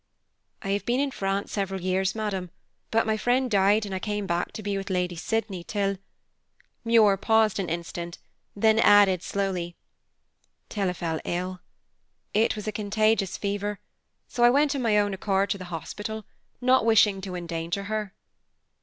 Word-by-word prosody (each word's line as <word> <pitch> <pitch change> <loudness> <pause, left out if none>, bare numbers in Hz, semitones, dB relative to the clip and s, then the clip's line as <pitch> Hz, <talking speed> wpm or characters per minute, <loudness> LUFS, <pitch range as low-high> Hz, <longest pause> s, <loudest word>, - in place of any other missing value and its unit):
"I 195 - -4
have 200 +1 0
been 245 +2 0
in 280 0 0
France 195 -3 -2
several 195 -2 -2
years, 185 +2 0
madam, 200 -5 -3 0.4
but 225 0 +2
my 220 -1 +1
friend 245 +2 +1
died 205 +2 +3
and 200 - -6
I 190 - -2
came 210 0 -3
back 170 -1 -1
to 215 - -7
be 200 0 -2
with 195 +1 -4
Lady 180 -1 -1
Sydney, 200 0 -2
till 200 0 -1 0.4
" - - -38
Muir 225 -4 +5
paused 220 0 +2
an 185 -3 -2
instant, 170 +1 -5 0.4
then 220 +2 +3
added, 205 -5 +6
slowly, 185 -3 -2 0.9
"till 200 -3 -1
I - - -2
fell 165 -2 -3
ill. 180 +1 -3 0.7
It 220 +2 +2
was 210 - -6
a - - 0
contagious 210 -1 +1
fever, 205 0 -3 0.5
so 240 - -1
I 240 - +8
went 285 +3 +3
of 275 - -2
my 220 -3 +3
own 205 -1 +2
accord 195 0 0
to 200 - -2
the 185 - -7
hospital, 210 +5 -6 0.4
not 255 0 +4
wishing 210 -3 +4
to 190 -1 -6
endanger 170 +2 -3
her." 210 -1 -4
200 Hz, 170 wpm, -26 LUFS, 185-220 Hz, 0.9 s, I